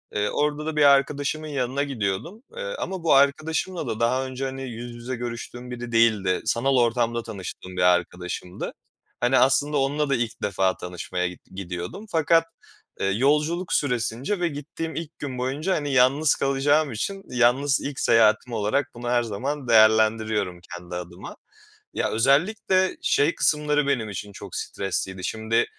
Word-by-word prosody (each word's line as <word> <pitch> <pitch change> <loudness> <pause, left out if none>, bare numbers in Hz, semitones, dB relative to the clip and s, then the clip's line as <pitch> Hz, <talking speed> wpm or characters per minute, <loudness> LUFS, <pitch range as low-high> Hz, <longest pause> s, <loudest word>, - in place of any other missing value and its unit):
Eee, 105 0 +1
orada 150 +1 -1
da 160 0 -3
bir 150 - +4
arkadaşımın 140 +2 +3
yanına 140 -1 -1
gidiyordum, 135 - -3
eee, - - -4
ama 190 -3 -4
bu 165 - +4
arkadaşımla 155 +4 +1
da 110 -1 -3
daha 125 +3 +1
önce, 130 +1 -4
hani, 135 0 -5
yüz 120 +1 -7
yüze 120 +2 -5
görüştüğüm 120 +1 -6
biri 120 -1 -6
değildi. 110 -5 +3
Sanal 135 +3 +2
ortamda 120 -1 +1
tanıştığım 95 -4 -8
bir - - +1
arkadaşımdı. 90 0 -1 0.5
Hani, 120 +2 +3
aslında 145 +3 +3
onunla 145 +2 0
da 140 - +3
ilk 115 -2 -3
defa 95 -2 +1
tanışmaya 90 0 -3
git 90 0 -10
gidiyordum. 90 - -6
Fakat, 165 0 +3 0.5
eee, - - -1
yolculuk 150 - +1
süresince 125 - 0
ve 175 - +1
gittiğim 160 +2 -6
ilk 165 -1 -6
gün 135 -3 -5
boyunca, 140 +9 -1
hani, 145 -2 -2
yalnız 135 +4 +4
kalacağım 140 +2 +2
için 195 - -4
yalnız 125 +3 +3
ilk 140 -1 -5
seyahatim 115 +1 +3
olarak 110 +6 0
bunu 120 0 -5
her 120 0 +2
zaman 130 +6 -4
değerlendiriyorum 110 -4 +3
kendi 90 0 -7
adıma. 90 0 -8 0.6
Ya, - - 0
özellikle 185 - +2
şey 150 +4 +2
kısımları 150 -1 +2
benim 120 -6 0
için 100 +1 -6
çok - - -9
stresliydi. 95 -1 -3
Şimdi 110 +2 0
125 Hz, 155 wpm, -24 LUFS, 110-145 Hz, 0.6 s, bir